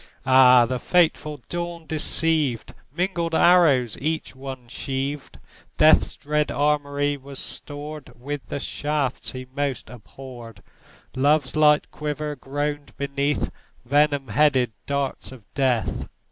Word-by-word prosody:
Ah, 130 Hz, -2 st, +7 dB
the 125 Hz, +1 st, -3 dB
fateful 155 Hz, -3 st, +1 dB
dawn 170 Hz, -1 st, -5 dB
deceived! 155 Hz, -4 st, 0 dB, 0.2 s
Mingled 170 Hz, -2 st, -1 dB
arrows 150 Hz, -11 st, +4 dB
each 155 Hz, -1 st, -2 dB
one 130 Hz, -2 st, -8 dB
sheaved; 135 Hz, +3 st, -4 dB, 0.4 s
Death's -, -, +5 dB
dread 150 Hz, +1 st, -1 dB
armoury 145 Hz, 0 st, 0 dB
was 135 Hz, 0 st, -11 dB
stored 145 Hz, -1 st, -6 dB
With 145 Hz, +2 st, -6 dB
the -, -, -4 dB
shafts 145 Hz, -2 st, -2 dB
he 130 Hz, 0 st, -7 dB
most 140 Hz, -5 st, -3 dB
abhorred; 120 Hz, -2 st, -11 dB, 0.5 s
Love's 145 Hz, +2 st, +2 dB
light 150 Hz, -1 st, +4 dB
quiver 150 Hz, 0 st, -4 dB
groaned 145 Hz, +2 st, -4 dB
beneath 140 Hz, +1 st, -1 dB, 0.3 s
Venom 145 Hz, 0 st, +2 dB
headed 130 Hz, -1 st, +3 dB, 0.2 s
darts 140 Hz, -2 st, -2 dB
of 130 Hz, -4 st, -12 dB
Death. 125 Hz, -, 0 dB
145 Hz, 115 wpm, -23 LUFS, 130-150 Hz, 0.5 s, Ah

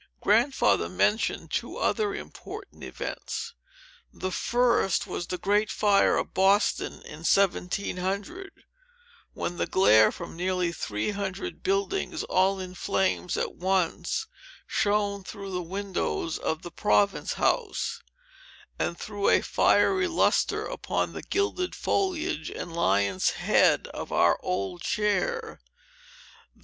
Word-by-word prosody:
Grandfather 210 Hz, -, +3 dB
mentioned 100 Hz, -, 0 dB
two -, -, -3 dB
other 415 Hz, -2 st, 0 dB
important 415 Hz, -, -9 dB
events. 465 Hz, +1 st, -5 dB, 0.6 s
The 185 Hz, -, -4 dB
first 240 Hz, -3 st, +2 dB
was 175 Hz, -, -5 dB
the 180 Hz, -, -3 dB
great 205 Hz, +3 st, +1 dB
fire 205 Hz, -2 st, +3 dB
of -, -, -3 dB
Boston, 195 Hz, +2 st, +2 dB
in -, -, -10 dB
1700, 195 Hz, -, -1 dB, 0.7 s
when 175 Hz, -, -4 dB
the -, -, -1 dB
glare 110 Hz, -, +5 dB
from -, -, -8 dB
nearly 180 Hz, 0 st, 0 dB
three 105 Hz, -, -3 dB
hundred 200 Hz, -, -4 dB
buildings, 390 Hz, -3 st, -1 dB
all 190 Hz, +1 st, +2 dB
in 185 Hz, -1 st, -6 dB
flames 190 Hz, -1 st, 0 dB
at -, -, -2 dB
once, 190 Hz, -, 0 dB, 0.4 s
shone 205 Hz, -1 st, 0 dB
through 200 Hz, +1 st, -8 dB
the 180 Hz, -1 st, -2 dB
windows 185 Hz, -2 st, -3 dB
of 160 Hz, 0 st, -2 dB
the 175 Hz, -, -7 dB
Province 200 Hz, +2 st, +1 dB
House, 465 Hz, 0 st, 0 dB, 0.8 s
and 170 Hz, -, -1 dB
threw 205 Hz, -1 st, -1 dB
a -, -, +5 dB
fierce 380 Hz, -1 st, +3 dB
lustre 340 Hz, -, +2 dB
upon -, -, -2 dB
the -, -, -6 dB
gilded 400 Hz, -2 st, -1 dB
foliage 350 Hz, -, -1 dB
and 170 Hz, -, -7 dB
lion's 100 Hz, -, +2 dB
head -, -, +3 dB
of -, -, -7 dB
our 85 Hz, -, +3 dB
old 90 Hz, -1 st, -3 dB
chair. 445 Hz, -, -1 dB
195 Hz, 120 wpm, -27 LUFS, 175-240 Hz, 0.8 s, glare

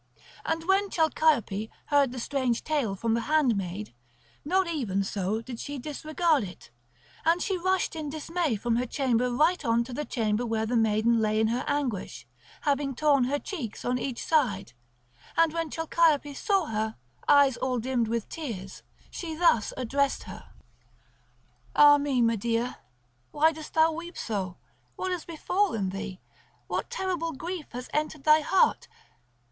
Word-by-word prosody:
And 325 Hz, 0 st, -1 dB
when 390 Hz, +1 st, +3 dB
Chalciope 295 Hz, -, +1 dB, 0.2 s
heard 285 Hz, -3 st, +3 dB
the 255 Hz, -, -6 dB
strange 255 Hz, -2 st, -1 dB
tale 280 Hz, -10 st, 0 dB
from 225 Hz, +3 st, -1 dB
the 230 Hz, -, +1 dB
handmaid, 210 Hz, -, 0 dB, 0.5 s
not 375 Hz, +5 st, +2 dB
even 240 Hz, -, -1 dB
so 200 Hz, +3 st, -2 dB
did 240 Hz, -1 st, -7 dB
she 285 Hz, 0 st, -5 dB
disregard 310 Hz, +2 st, 0 dB
it. 180 Hz, -10 st, -10 dB, 0.5 s
And 335 Hz, +2 st, +3 dB
she 385 Hz, +1 st, -1 dB
rushed 370 Hz, 0 st, 0 dB
in 310 Hz, -2 st, -4 dB
dismay 315 Hz, -2 st, -1 dB
from 230 Hz, +2 st, 0 dB
her 250 Hz, +1 st, -1 dB
chamber 250 Hz, -2 st, +1 dB
right 310 Hz, +7 st, +2 dB
on 235 Hz, -2 st, +2 dB
to 245 Hz, +1 st, -9 dB
the 295 Hz, -, -2 dB
chamber 225 Hz, -4 st, -1 dB
where 225 Hz, -2 st, -1 dB
the 240 Hz, +2 st, -1 dB
maiden 225 Hz, +1 st, +3 dB
lay 215 Hz, 0 st, +1 dB
in 220 Hz, 0 st, +3 dB
her 245 Hz, +3 st, -1 dB
anguish, 280 Hz, -9 st, -2 dB, 0.4 s
having 280 Hz, -2 st, 0 dB
torn 280 Hz, -2 st, +3 dB
her 280 Hz, +3 st, 0 dB
cheeks 285 Hz, -, -6 dB
on 250 Hz, +1 st, 0 dB
each 250 Hz, -1 st, -4 dB
side; 240 Hz, -, +1 dB, 0.6 s
and 330 Hz, -1 st, +4 dB
when 330 Hz, -1 st, -2 dB
Chalciope 320 Hz, -3 st, +2 dB
saw 390 Hz, 0 st, +1 dB
her 220 Hz, -3 st, -2 dB, 0.3 s
eyes 285 Hz, -3 st, +6 dB
all 255 Hz, -1 st, -1 dB
dimmed 240 Hz, -1 st, 0 dB
with 230 Hz, -1 st, -2 dB
tears, 215 Hz, -, -6 dB, 0.3 s
she 325 Hz, -3 st, -5 dB
thus 310 Hz, -10 st, +3 dB
addressed 270 Hz, +3 st, 0 dB
her: -, -, -11 dB, 1.3 s
"Ah 290 Hz, 0 st, +8 dB
me, 275 Hz, -4 st, +1 dB
Medea, 230 Hz, +2 st, 0 dB, 0.5 s
why 315 Hz, +2 st, +3 dB
dost 315 Hz, -1 st, -10 dB
thou 320 Hz, 0 st, +5 dB
weep 340 Hz, +2 st, -7 dB
so? 190 Hz, -5 st, -3 dB, 0.4 s
What 375 Hz, -, -3 dB
hath 360 Hz, -3 st, -4 dB
befallen 335 Hz, -, 0 dB
thee? 195 Hz, -1 st, -6 dB, 0.5 s
What -, -, -3 dB
terrible 350 Hz, -4 st, -2 dB
grief 330 Hz, +3 st, -5 dB
has 250 Hz, +1 st, -6 dB
entered 305 Hz, -1 st, -2 dB
thy 305 Hz, +1 st, +6 dB
heart? 370 Hz, +5 st, +2 dB
275 Hz, 155 wpm, -27 LUFS, 230-315 Hz, 1.3 s, Ah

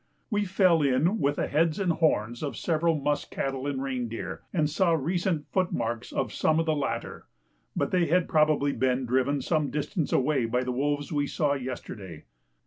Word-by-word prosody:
We 205 Hz, -1 st, +1 dB
fell 185 Hz, -4 st, +3 dB
in 145 Hz, +10 st, +2 dB
with 145 Hz, -2 st, +1 dB
the -, -, 0 dB
heads 155 Hz, +1 st, +1 dB
and 185 Hz, -3 st, +1 dB
horns 120 Hz, -8 st, +1 dB
of 145 Hz, -2 st, -4 dB
several 165 Hz, 0 st, +1 dB
musk 145 Hz, +1 st, -1 dB
cattle 135 Hz, 0 st, -3 dB
and 135 Hz, -2 st, -2 dB
reindeer, 125 Hz, -4 st, -4 dB
and 155 Hz, -5 st, +1 dB
saw 170 Hz, +3 st, +2 dB
recent 165 Hz, +1 st, 0 dB
footmarks 120 Hz, -11 st, -1 dB
of 130 Hz, -5 st, -2 dB
some 155 Hz, 0 st, +2 dB
of 165 Hz, -, +1 dB
the 160 Hz, -, +2 dB
latter, 140 Hz, -2 st, -4 dB, 0.5 s
but -, -, 0 dB
they 180 Hz, -2 st, +2 dB
had 180 Hz, +2 st, +2 dB
probably 155 Hz, -2 st, +3 dB
been 130 Hz, 0 st, 0 dB
driven 130 Hz, +3 st, +1 dB
some 155 Hz, -1 st, 0 dB
distance 150 Hz, +2 st, -2 dB
away 135 Hz, -2 st, +2 dB
by 125 Hz, +2 st, 0 dB
the 125 Hz, -, -2 dB
wolves 145 Hz, +3 st, -1 dB
we 145 Hz, -1 st, +1 dB
saw 145 Hz, -1 st, +1 dB
yesterday. 110 Hz, -, -6 dB
145 Hz, 180 wpm, -27 LUFS, 130-165 Hz, 0.5 s, fell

